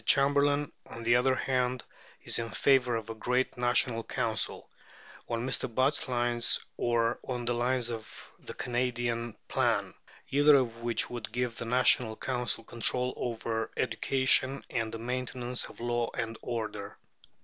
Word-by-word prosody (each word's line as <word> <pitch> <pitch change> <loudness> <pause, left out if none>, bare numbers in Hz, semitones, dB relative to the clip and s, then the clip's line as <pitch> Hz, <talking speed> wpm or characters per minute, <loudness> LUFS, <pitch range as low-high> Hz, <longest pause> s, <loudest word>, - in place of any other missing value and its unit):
Chamberlain, 145 +1 +3 0.2
on 115 - -9
the 115 +1 +4
other 130 +2 +3
hand, 125 -1 0 0.4
is - - +1
in 115 0 -3
favour 125 -1 +3
of 115 0 -4
a - - -4
great 125 +4 0
National 120 -1 +2
Council, 110 -3 -1 0.6
on 115 +1 -2
Mr. 130 - -1
Butt's 130 +6 +1
lines 120 -1 +3 0.2
or 120 0 +1
on 125 -2 -4
the 120 - +1
lines 120 0 +1
of 110 -1 -9
the - - -9
Canadian 120 -2 -2
plan; 110 -7 0 0.4
either 145 +1 +6
of 120 -4 +1
which 120 0 0
would 115 -3 -6
give 120 0 -2
the - - -4
National 120 -1 +3
Council 125 -2 -1
control 125 +2 +1
over 115 -2 -3
education 135 0 +2
and 115 -3 -1
the 115 - -5
maintenance 125 +1 -2
of - - -13
law 120 0 -1
and 115 -1 -3
order. 110 -4 -5
120 Hz, 150 wpm, -30 LUFS, 115-125 Hz, 0.6 s, either